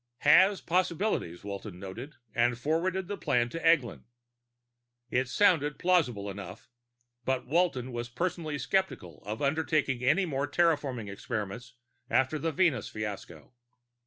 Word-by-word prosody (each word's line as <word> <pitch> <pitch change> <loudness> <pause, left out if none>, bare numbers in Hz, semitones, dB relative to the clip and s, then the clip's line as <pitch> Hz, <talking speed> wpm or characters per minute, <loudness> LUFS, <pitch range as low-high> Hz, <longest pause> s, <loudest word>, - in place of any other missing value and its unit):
Has 185 +7 +6
possibilities, 175 - 0
Walton 100 -2 -7
noted, 115 +10 -8 0.2
and 120 0 +2
forwarded 175 +7 -1
the 205 0 -4
plan 135 -5 +2
on 120 - -1
to 165 - -5
Eglin. 155 -13 +2 1.1
It 125 0 +1
sounded 150 -6 +3
plausible 145 - +1
enough, 100 +1 -8 0.6
but 130 +1 -1
Walton 135 -4 +1
was 120 0 -4
personally 160 +2 -2
skeptical 135 - -2
of 110 +6 -3
undertaking 140 -3 +1
any 180 +9 +3
more 140 -3 -1
terraforming 145 -9 +1
experiments 110 +3 -5 0.3
after 135 +4 +2
the 165 +2 -1
Venus 155 - +1
fiasco. 105 -4 -7
135 Hz, 130 wpm, -29 LUFS, 115-165 Hz, 1.1 s, Has